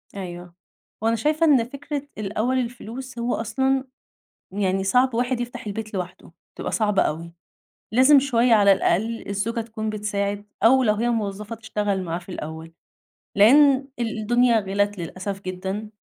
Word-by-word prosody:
أيوَه، 175 -2 -7 0.5
وأنا 225 +1 +2
شايفة 305 +8 +1
إن 280 -7 +5
فكرة 285 +3 -6
الأوّل 215 +5 -1
الفلوس 245 +1 -6
هو 240 +1 0
أصلًا 265 +4 0 0.7
يعني 195 -1 0
صعب 250 +5 +3
واحد 245 +1 0
يفتح 245 0 -6
البيت 215 +1 -5
لوحده، 180 -2 -6 0.2
تبقى - - -4
صعبة 210 -3 +2
أوي، 165 +2 -3 0.6
لازم 260 +4 +7
شويّة 245 -3 +3
على 200 -2 +6
الأقل 220 +4 0
الزوجة 215 +4 -2
تكون 220 -1 -4
بتساعد 205 -1 -2 0.2
أو 260 +4 +6
لو 215 -4 +3
هي 230 +3 0
موظفة 210 -1 -3
تشتغل 210 -3 -2
معاه 170 -1 -3
في 180 +2 -16
الأوّل، 160 -2 -7 0.6
لأن 270 +5 +6
ال 230 -2 -2
الدنيا 235 +1 +3
غلت 205 +1 -1
للأسف 185 +3 -5
جدًا، 190 +3 -5
220 Hz, 145 wpm, -23 LUFS, 195-245 Hz, 0.7 s, لازم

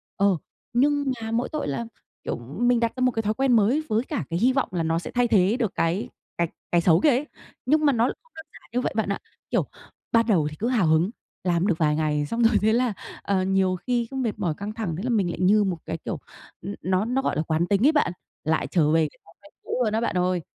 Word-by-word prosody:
Ờ, 200 -2 +3 0.4
nhưng 285 +4 +2 0.2
mà 225 0 -4
mỗi 235 +2 0
tội 305 -1 -2
là, 145 +11 -2 0.4
kiểu, - - -2 0.2
mình 245 0 +3
đặt 230 -1 0
ra 255 - -5
một 255 - +4
cái 225 - -1
thói 210 - +1
quen 265 +2 +1
mới 235 +9 +3
với 220 +2 +1
cả 260 - -3
cái 170 - -1
hy 250 +5 +3
vọng 270 -1 0
là 175 -2 -1
nó 165 +1 +1
sẽ - - -7
thay 245 0 +2
thế 205 +1 +3
được 225 -6 0
cái 170 +5 0 0.3
cái 170 - +1 0.2
cái 175 - +4
xấu 165 -1 +5
kia - - +5
ấy, 270 +2 +2 0.4
nhưng 305 +4 +3
mà 285 - +5
nó 230 -2 +2
không 485 - -6
đơn 320 - -9
giản - - -16
như 250 - +1
vậy - - -2
bạn 220 -3 0
ạ. 200 - -1 0.3
Kiểu, - - +2 0.5
ban 230 0 +4
đầu 170 -9 +3
thì - - -8
cứ 230 - 0
hào 235 -9 +2
hứng, 160 +4 +3 0.3
làm 175 +1 +1
được 180 -6 +1
vài 150 -2 +2
ngày 150 -1 0
xong 230 +10 -1
rồi 225 -1 +5
thế 220 +1 +3
là, 245 -1 +2 0.3
ờ, 195 -2 0
nhiều 190 -1 +2
khi 240 +4 -1
cứ - - -7
mệt 230 -5 -2
mỏi, 175 -6 0
căng 205 +1 -5
thẳng, 215 -8 -3
thế 185 - -5
là 255 - -2
mình 205 -7 +2
lại 170 - -5
như 205 +3 +5
một 185 -3 -1
cái, - - -3
kiểu, - - -3 0.4
ừ, 200 +3 -5
nó 185 +2 +1
nó 250 +3 0
gọi - - -1
là 155 - +1
quán 160 +2 0
tính 205 +4 +2
ấy 300 - +7
bạn, 295 - +2 0.3
lại 160 +1 0
trở 155 -4 +3
về 160 -1 +3
cái - - -25
thói 165 - -19
quen 200 - -18
cũ - - -9
luôn 215 -2 0
á 220 - +1
bạn 235 - -1
ơi. 180 0 +1
210 Hz, 270 wpm, -25 LUFS, 175-245 Hz, 0.5 s, ấy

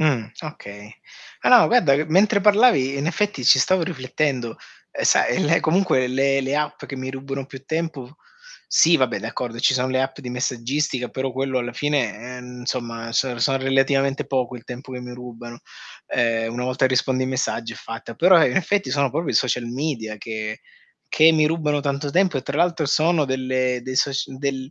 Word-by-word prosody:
Mh, 135 -9 +1
okay. 105 -8 -10 0.5
Ah - - +1
no, 250 - +9
ma - - +5
guarda 180 - +4
che, 150 - 0
mentre 200 +6 +3
parlavi, 210 - +4
i 140 - -4
in 140 - -2
effetti 180 -5 -1
ci 130 - +7
stavo 185 +7 +2
riflettendo. 130 -5 -2 0.4
E - - -3
sai, 125 - +3
le 165 +3 +3
comunque 160 -6 +2
le 135 +2 +1
le 135 +1 -2
app 150 0 -3
che 140 - -7
mi 130 0 -5
rubano 135 0 -6
più 135 -1 -12
tempo 155 -3 -4 0.5
sì, 165 +1 +5
va 130 - +3
beh, - - -3
d'accordo, 115 +1 -5
ci 125 - +3
sono 130 0 0
le 130 0 0
app 135 0 -4
di 125 - -7
messaggistica, 125 +1 -2
però 130 0 -4
quello 135 +1 -2
alla 120 0 -4
fine, 125 -4 -2
ehm, 125 0 -10
insomma, 115 -2 -4
so 125 0 0
sono 135 +3 +2
relativamente 135 +1 +1
poco 130 -2 -2
il 120 - -12
tempo 130 +1 -9
che 125 - -6
mi 125 0 -8
rubano. 120 -1 -10 0.5
Eh, 115 -1 0
una 120 +2 -4
volta 130 +1 +1
rispondi 130 0 +1
ai 130 - -2
messaggi 120 -3 -2
è - - -10
fatta. 115 0 -8
Però, 170 +5 +5
in 125 - 0
effetti, 195 -4 0
sono 140 0 +1
proprio 160 +3 -2
i - - -4
social 125 -1 +1
media 120 -4 -4
che 110 0 -6 0.5
che 160 +1 +6
mi 155 -1 +3
rubano 150 -2 0
tanto 140 +1 -2
tempo 180 0 +2
e 130 - -3
tra 140 +3 -4
l'altro 170 -2 +1
sono 155 +2 +2
delle 130 -1 -1
dei 130 +1 -5
soc 140 +2 +2 0.2
del 135 -1 -3
135 Hz, 200 wpm, -22 LUFS, 125-150 Hz, 0.5 s, no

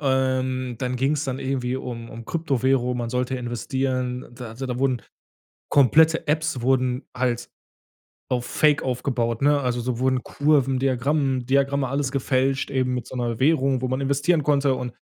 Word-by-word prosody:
ähm, 130 -2 0
dann 125 +1 -2
ging's 140 +4 0
dann 130 -2 -3
irgendwie 130 -2 -2
um 120 -3 -6
um 115 0 -9
Kryptowährung, 130 -5 0
man 120 -1 -3
sollte 125 +1 -1
investieren. 125 +1 -2
Da 125 0 -8
also, 115 +4 -7
da 125 -1 -3
wurden 130 -2 0 0.7
komplette 155 +4 +4
Apps 155 -3 0
wurden 130 0 +1
halt 120 -1 -1 0.8
auf 125 -2 -1
Fake 150 -2 +2
aufgebaut, 125 -2 -1
ne? 145 0 +3
Also, 125 -1 -1
so 120 0 -2
wurden 130 0 +1
Kurven, 140 -3 +1
Diagramm 135 0 0
Diagramme, 140 +1 +1
alles 135 0 -1
gefälscht 135 0 0
eben 130 -2 0
mit 125 -2 -4
so - - -9
'ner 120 -2 -2
Währung, 135 -2 +2
wo 130 - -1
man 130 +2 -1
investieren 145 +4 +1
konnte 140 -2 +2
und 125 -1 -4
130 Hz, 165 wpm, -24 LUFS, 125-140 Hz, 0.8 s, komplette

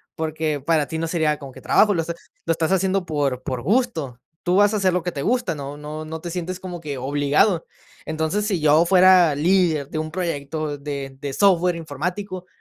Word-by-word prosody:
porque 155 -1 -2
para 150 +1 +1
ti 160 - -4
no 165 - -1
sería 160 -3 0
como 140 -2 -10
que - - -13
trabajo, 210 -1 +4
lo 170 - +1
est 165 +1 -4 0.3
lo - - +3
estás 165 +1 0
haciendo 190 0 +1
por 145 -5 -1
por 130 -4 -3
gusto, 175 - 0 0.2
tú 180 - +1
vas 205 +2 +5
a - - +1
hacer 190 -2 +2
lo 180 -1 -1
que 180 - -2
te 140 - -5
gusta, 245 - 0
no 145 -1 -7
no 150 +1 -6
no 160 +1 -6
te 170 +1 -6
sientes 180 +1 -4
como 180 -2 -7
que 145 -4 -5
obligado, 145 +7 +1 0.4
entonces, 160 +7 -1
si 195 -5 0
yo 155 +2 +4
fuera 185 -4 +6
líder 165 -2 +2
de 155 - -2
un 155 0 -3
proyecto 155 -3 -3
de 140 -2 -5
de 140 -1 -3
software 180 -2 +3
informático, 180 +4 -5
160 Hz, 210 wpm, -22 LUFS, 145-185 Hz, 0.4 s, fuera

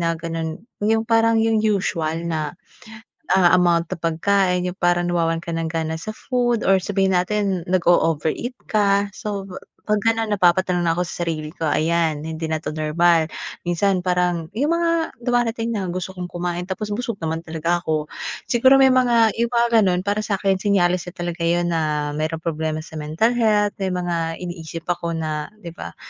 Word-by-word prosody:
na 165 -1 0
ganun 165 +1 -5 0.2
yung 220 +2 +2
parang 225 0 +3
yung 225 -1 +2
usual 170 -6 0
na 160 0 -3 0.8
ah, 180 -2 +5
amount 170 -1 +2
ng - - -4
pagkain 180 +3 +1
yung 185 - -15
parang 175 0 +2
nawawalan 165 -1 0
ka 170 - -5
ng 165 0 -2
gana 160 0 -2
sa 215 +6 -6
food 240 -3 0
or 195 0 +4
sabihin 195 0 0
natin 185 -1 0
nag-o-overeat 175 - +1 0.2
ka. 200 -1 +2
So 200 -1 -5 0.4
pag 210 -1 +1
ganun 225 -2 +1
napapatanong 180 -1 +2
na 170 - +2
ako 175 +1 -1
sa 175 - -4
sarili 160 -2 -3
ko. - - -6
Ayan 160 0 +1
hindi 160 0 -5
na 155 - 0
to 155 - -5
normal, 160 +1 +2 0.3
minsan 180 +2 +1
parang 180 -2 0
yung 285 +10 +1
mga 335 -1 0
dumarating 235 -1 0
na 200 -4 -2
gusto 185 +2 -4
kong 180 -1 -6
kumain 175 0 -4
tapos 205 +2 -4
busog 230 +1 -2
naman 160 0 -1
talaga 165 +1 -1
ako. 155 -3 -1 0.5
Siguro 260 +3 +6
may 270 -1 +6
mga 240 -4 +4
yung 235 - +2
mga 235 0 +3 0.2
ganun, 180 -1 +1
para 205 +1 0
sa'kin 195 -2 0
senyales 180 -3 +1
na 180 - -7
talaga 175 0 -4
yun 175 0 +1
na 150 -2 0
merong 155 +1 -3
problema 155 -1 -2
sa 160 -1 -8
mental 155 +10 +1
health, 210 -3 +2
may 195 - -1
mga 175 -1 -1 0.3
iniisip 165 -2 -6
ako 170 -1 -2
na 155 -2 -3 0.2
di 170 - -6
ba 85 - -9
180 Hz, 175 wpm, -22 LUFS, 165-210 Hz, 0.8 s, Siguro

